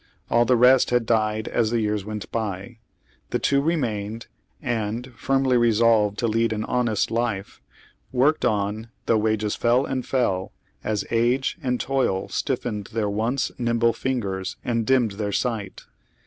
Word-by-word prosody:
All 120 Hz, 0 st, +4 dB
the 125 Hz, -, +4 dB
rest 125 Hz, +2 st, +5 dB
had 120 Hz, -1 st, +2 dB
died 110 Hz, -1 st, +1 dB
as 115 Hz, -2 st, +1 dB
the 120 Hz, 0 st, +1 dB
years 105 Hz, -2 st, -1 dB
went 105 Hz, -2 st, -6 dB
by. 110 Hz, +1 st, -4 dB, 0.5 s
The -, -, 0 dB
two 140 Hz, 0 st, +2 dB
remained 115 Hz, -8 st, -2 dB, 0.3 s
and, 120 Hz, +2 st, -3 dB
firmly 135 Hz, 0 st, +2 dB
resolved 115 Hz, -3 st, +3 dB
to 115 Hz, -, 0 dB
lead 115 Hz, +1 st, +1 dB
an 110 Hz, 0 st, -2 dB
honest 120 Hz, -4 st, 0 dB
life, 115 Hz, -4 st, -2 dB, 0.5 s
worked 135 Hz, +5 st, +2 dB
on 105 Hz, 0 st, -1 dB, 0.2 s
though 110 Hz, -, +3 dB
wages 110 Hz, -1 st, 0 dB
fell 120 Hz, +3 st, +2 dB
and 130 Hz, -1 st, -2 dB
fell 95 Hz, -9 st, -1 dB, 0.3 s
as 105 Hz, -2 st, -1 dB
age 120 Hz, +3 st, +1 dB
and 125 Hz, -3 st, -1 dB
toil 130 Hz, -8 st, 0 dB
stiffened 105 Hz, -4 st, -2 dB
their 105 Hz, -2 st, 0 dB
once 115 Hz, +6 st, -1 dB
nimble 115 Hz, -1 st, +2 dB
fingers 100 Hz, -7 st, -3 dB
and 115 Hz, -2 st, 0 dB
dimmed 130 Hz, -5 st, +3 dB
their 100 Hz, +1 st, -3 dB
sight. 110 Hz, -3 st, -2 dB
115 Hz, 150 wpm, -24 LUFS, 105-125 Hz, 0.5 s, rest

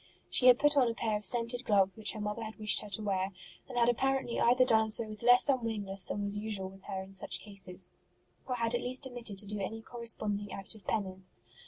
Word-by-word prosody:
She 255 Hz, -, +3 dB
had 250 Hz, -1 st, +8 dB
put 295 Hz, +1 st, +3 dB
on 265 Hz, -3 st, +4 dB
a 230 Hz, -, -4 dB
pair 220 Hz, -2 st, -2 dB
of 210 Hz, -, -4 dB
scented 240 Hz, +2 st, +4 dB
gloves 195 Hz, -5 st, +2 dB
which 220 Hz, -, +4 dB
her 215 Hz, -, -8 dB
mother 210 Hz, +2 st, -4 dB
had 220 Hz, 0 st, -8 dB
wished 215 Hz, -3 st, +2 dB
her 210 Hz, -, -10 dB
to 215 Hz, +2 st, +4 dB
wear, 190 Hz, -1 st, -2 dB, 0.4 s
and 250 Hz, -, -7 dB
had 235 Hz, -1 st, +3 dB
appar 270 Hz, +3 st, +1 dB
ently 240 Hz, -3 st, -5 dB
either 250 Hz, +2 st, +4 dB
done 220 Hz, -2 st, +3 dB
so 220 Hz, +2 st, +3 dB
with 215 Hz, -1 st, -10 dB
less 245 Hz, +2 st, +5 dB
unwillingness 215 Hz, -7 st, -1 dB
than 205 Hz, -, -3 dB
was 200 Hz, 0 st, -3 dB
usual 205 Hz, -3 st, -3 dB
with 195 Hz, 0 st, -17 dB
her 190 Hz, -1 st, -5 dB
in 190 Hz, +1 st, -15 dB
such 190 Hz, -, +1 dB
cases, 195 Hz, -3 st, +1 dB, 0.6 s
or 255 Hz, -, -2 dB
had 230 Hz, -1 st, +2 dB
at 240 Hz, -, 0 dB
least 255 Hz, +2 st, -2 dB
omitted 240 Hz, -5 st, -5 dB
to 205 Hz, -, -1 dB
do 210 Hz, +1 st, -4 dB
any 220 Hz, +3 st, -5 dB
corresponding 215 Hz, -4 st, -2 dB
act 195 Hz, -1 st, -9 dB
of 210 Hz, -4 st, -18 dB
penance. 190 Hz, -3 st, -4 dB
215 Hz, 240 wpm, -31 LUFS, 200-240 Hz, 0.6 s, had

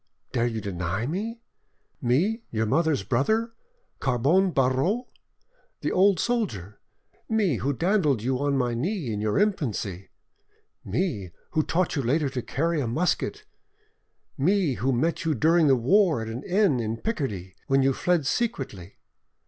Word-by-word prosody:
Dare 120 Hz, 0 st, +1 dB
you 115 Hz, -2 st, -3 dB
deny 95 Hz, +2 st, -3 dB
me?—me, 200 Hz, -, -3 dB
your 110 Hz, -1 st, -1 dB
mother's 155 Hz, 0 st, +1 dB
brother, 220 Hz, -, 0 dB, 0.5 s
Carbon 145 Hz, +10 st, +2 dB
Barreau, 140 Hz, -, +1 dB, 0.8 s
the -, -, -1 dB
old 190 Hz, -1 st, +4 dB
soldier! 130 Hz, -, -2 dB, 0.5 s
Me, 205 Hz, -, +2 dB
who 130 Hz, +8 st, -1 dB
dandled 150 Hz, -, +1 dB
you 130 Hz, +1 st, 0 dB
on 140 Hz, -1 st, +1 dB
my 125 Hz, -2 st, 0 dB
knee 145 Hz, -, -2 dB
in 105 Hz, -, -3 dB
your 105 Hz, -1 st, 0 dB
infancy; 115 Hz, -, -1 dB, 0.7 s
me, 125 Hz, -, -2 dB, 0.2 s
who 155 Hz, -, +2 dB
taught 170 Hz, +3 st, 0 dB
you 140 Hz, -, 0 dB
later 140 Hz, +4 st, +1 dB
to 130 Hz, -2 st, -3 dB
carry 165 Hz, +5 st, -1 dB
a 125 Hz, -, -2 dB
musket; 160 Hz, +10 st, -1 dB, 0.9 s
me, 180 Hz, 0 st, +2 dB
who 130 Hz, +2 st, 0 dB
met 160 Hz, +9 st, 0 dB
you 160 Hz, -2 st, +1 dB
during 160 Hz, +4 st, +4 dB
the 135 Hz, -, +6 dB
war 165 Hz, -, +3 dB
at 110 Hz, -, -4 dB
an 115 Hz, +3 st, -5 dB
inn 190 Hz, -, +2 dB
in 110 Hz, 0 st, -2 dB
Picardy, 110 Hz, -, -3 dB
when 135 Hz, 0 st, +3 dB
you 135 Hz, 0 st, +3 dB
fled 175 Hz, +1 st, +1 dB
secretly. 135 Hz, -, -3 dB
140 Hz, 145 wpm, -26 LUFS, 120-185 Hz, 0.9 s, the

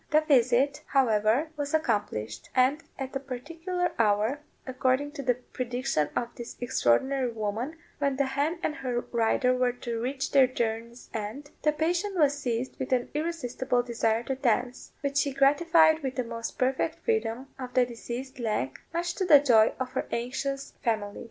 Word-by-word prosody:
The 305 Hz, +1 st, +5 dB
visit, 275 Hz, 0 st, +3 dB
however, 240 Hz, +2 st, +2 dB
was 290 Hz, +1 st, -1 dB
accomplished; 205 Hz, -, -1 dB
and 265 Hz, +4 st, +3 dB, 0.2 s
at 270 Hz, 0 st, -5 dB
a -, -, 0 dB
particular 330 Hz, +8 st, -3 dB
hour, 215 Hz, +5 st, +2 dB, 0.3 s
according 260 Hz, +2 st, 0 dB
to 290 Hz, -2 st, -6 dB
the 250 Hz, -2 st, +2 dB
prediction 250 Hz, -, -2 dB
of 235 Hz, -, -1 dB
this 235 Hz, 0 st, -8 dB
extraordinary 245 Hz, -, +2 dB
woman, 225 Hz, +7 st, -3 dB, 0.2 s
when 280 Hz, -2 st, +1 dB
the 275 Hz, +1 st, +1 dB
hen 285 Hz, +6 st, -1 dB
and 305 Hz, -, -1 dB
her 250 Hz, -4 st, -2 dB
rider 240 Hz, +2 st, +2 dB
were 250 Hz, -1 st, +1 dB
to 235 Hz, -2 st, -4 dB
reach 265 Hz, +3 st, -2 dB
their 270 Hz, -2 st, +6 dB
journey's 235 Hz, -1 st, -4 dB
end, 225 Hz, +7 st, -5 dB
the 300 Hz, -, +3 dB
patient 350 Hz, +6 st, -1 dB
was 290 Hz, -3 st, +4 dB
seized 250 Hz, -3 st, -3 dB
with 260 Hz, -, -4 dB
an 250 Hz, -1 st, +1 dB
irresistible 270 Hz, -6 st, -1 dB
desire 230 Hz, -1 st, 0 dB
to 265 Hz, -, -2 dB
dance, 250 Hz, -1 st, -1 dB
which 280 Hz, -1 st, -1 dB
she 280 Hz, -1 st, +2 dB
gratified 315 Hz, +4 st, +5 dB
with 265 Hz, -2 st, -3 dB
the 255 Hz, -, 0 dB
most 230 Hz, 0 st, -6 dB
perfect 260 Hz, +1 st, 0 dB
freedom 275 Hz, -, -1 dB
of 255 Hz, -1 st, -7 dB
the 255 Hz, -1 st, +5 dB
diseased 245 Hz, +2 st, -7 dB
leg, 210 Hz, -, -2 dB, 0.2 s
much 345 Hz, +1 st, 0 dB
to 380 Hz, -, -2 dB
the 320 Hz, -5 st, +8 dB
joy 230 Hz, -6 st, +5 dB
of 255 Hz, -1 st, -3 dB
her 260 Hz, -, -2 dB
anxious 270 Hz, +3 st, -3 dB
family. 215 Hz, -4 st, -1 dB
260 Hz, 170 wpm, -28 LUFS, 235-285 Hz, 0.3 s, the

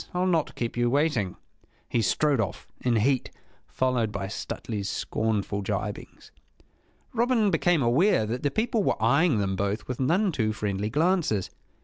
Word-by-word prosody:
I'll 180 Hz, +1 st, +1 dB
not 170 Hz, -4 st, +1 dB
keep 120 Hz, -1 st, -3 dB
you 120 Hz, 0 st, +2 dB
waiting!" 130 Hz, -, +1 dB, 0.5 s
He 115 Hz, -, 0 dB
strode 140 Hz, +7 st, +2 dB
off, 105 Hz, -, -4 dB
in 125 Hz, -2 st, +1 dB
heat, 125 Hz, +4 st, +1 dB, 0.4 s
followed 125 Hz, -4 st, 0 dB
by 100 Hz, -1 st, -4 dB
Stuteley's 105 Hz, -1 st, -4 dB
scornful 105 Hz, -2 st, -1 dB
gibings. 95 Hz, -, -5 dB, 0.8 s
Robin 235 Hz, -3 st, +2 dB
became 165 Hz, -2 st, +2 dB
aware 125 Hz, -, +3 dB
that 120 Hz, +4 st, -3 dB
the 145 Hz, -, +1 dB
people 220 Hz, +5 st, 0 dB
were -, -, 0 dB
eyeing 140 Hz, +5 st, +3 dB
them 100 Hz, -2 st, 0 dB
both 100 Hz, +2 st, -2 dB
with 125 Hz, -, -4 dB
none 180 Hz, +9 st, +2 dB
too 110 Hz, -7 st, 0 dB
friendly 105 Hz, -1 st, -2 dB
glances. 155 Hz, -, +1 dB
120 Hz, 150 wpm, -26 LUFS, 105-165 Hz, 0.8 s, aware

